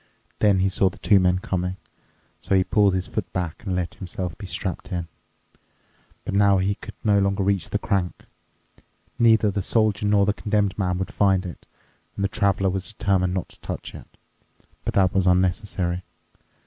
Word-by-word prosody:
Then 100 -3 +4
he 95 - +3
saw 95 0 +2
the - - -14
two 100 -2 +4
men 90 -1 +3
coming. 90 0 -2 0.6
So 95 - 0
he 95 - +4
pulled 100 0 +3
his 95 0 -1
foot 95 -2 -4
back 90 -3 -3
and 95 -4 -2
let 90 -1 -2
himself 90 -2 -5
be 100 +2 -9
strapped 90 -1 -4
in. 85 -2 -3 1.2
But - - -3
now 100 0 +4
he 95 +2 +1
could - - -11
no 105 -2 +4
longer 100 0 +1
reach 100 -2 0
the - - 0
crank. 95 -3 -2 1.0
Neither 110 -3 +5
the 100 0 -2
Soldier 105 0 +1
nor 100 -1 +4
the 105 - +2
Condemned 105 -2 0
Man 90 -3 -1
would 95 - -4
find 95 -2 +2
it, 85 - -9 0.5
and 100 - -1
the - - 0
Traveler 100 -3 +1
was 95 0 -3
determined 95 -3 +1
not 90 - -3
to - - -16
touch - - -6
it. - - -11 0.8
But - - -2
that 95 -2 +3
was 95 -1 +2
unnecessary. 90 -1 +1
95 Hz, 185 wpm, -24 LUFS, 90-100 Hz, 1.2 s, Neither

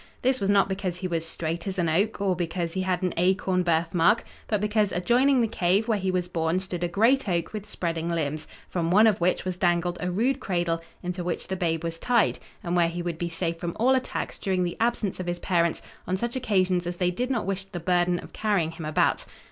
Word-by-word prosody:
This 260 +1 +2
was 195 - 0
not 200 -1 +4
because 190 -2 -3
he 185 0 -3
was 165 -2 -1
straight 165 +2 -3
as 195 0 -3
an 175 -2 +1
oak, 195 +8 +1
or 195 -2 +1
because 170 -1 -2
he 190 - -1
had 185 -1 -1
an 180 - 0
acorn 185 +1 +2
birthmark, 170 +4 +2 0.2
but 210 - +1
because 210 -1 +1
adjoining 250 +8 +3
the 230 - +2
cave 195 +2 +1
where 220 -3 +1
he 190 0 -1
was 180 -1 0
born 165 0 0
stood 185 -2 -4
a - - +2
great 225 +7 +3
oak 170 +2 -1
with 210 -1 -6
spreading 165 -4 -2
limbs, 155 -2 -2 0.2
from 170 -2 -1
one 210 +5 +6
of 215 -5 +3
which 180 +2 +1
was 185 -1 -2
dangled 175 0 +1
a 180 - -1
rude 245 +9 +1
cradle, 175 -6 -1 0.2
into 180 0 -3
which 175 +1 -3
the 190 - -1
babe 165 -3 -1
was 165 0 -3
tied, 240 +2 +2 0.2
and 175 0 -1
where 170 -1 +4
he 175 +1 -4
would 170 -2 -4
be 175 - -2
safe 165 0 -3
from 170 -1 -4
all 255 +4 +4
attacks 260 0 -2
during 185 -2 0
the 175 - -2
absence 230 -5 0
of 180 - -4
his 175 0 -1
parents 170 -2 0 0.2
on 185 - 0
such 235 +4 -3
occasions 185 -7 +1
as 175 0 -4
they 180 0 +1
did 250 +8 -2
not 245 -4 0
wish 195 0 -2
the 195 -2 -6
burden 175 +1 +2
of - - -10
carrying 200 -7 0
him 165 -1 -8
about. 155 0 +1
180 Hz, 235 wpm, -26 LUFS, 170-200 Hz, 0.2 s, one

